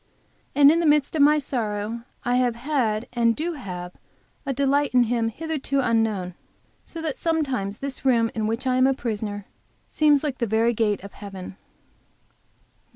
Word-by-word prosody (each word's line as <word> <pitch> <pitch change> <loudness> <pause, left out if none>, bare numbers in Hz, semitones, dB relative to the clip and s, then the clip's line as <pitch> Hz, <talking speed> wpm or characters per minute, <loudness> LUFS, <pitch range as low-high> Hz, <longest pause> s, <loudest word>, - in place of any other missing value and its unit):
And 285 0 +7
in 330 - +2
the 335 - +2
midst 295 0 +3
of 305 - +2
my 300 +2 +6
sorrow 230 -4 -3 0.2
I 245 +1 +2
have 245 -2 +1
had 240 -4 -1
and 230 -1 +2
do 335 +3 -2
have 180 - -7 0.6
a - - +1
delight 280 +1 +1
in 250 - +6
Him 230 -1 0
hitherto 295 +1 -2
unknown, 225 -7 0 0.5
so 330 -1 -8
that 310 -4 -3
sometimes 270 -12 -1
this 275 0 -6
room 235 -4 +3
in 215 -1 -1
which 230 +4 -2
I 255 -1 +2
am 255 +1 +5
a 270 - +2
prisoner 210 -4 -4 0.4
seems 295 -2 +3
like 280 -4 -3
the 235 - 0
very 225 +3 +2
gate 210 -3 0
of 200 - -10
heaven. 195 -2 -9
245 Hz, 170 wpm, -24 LUFS, 220-280 Hz, 0.6 s, And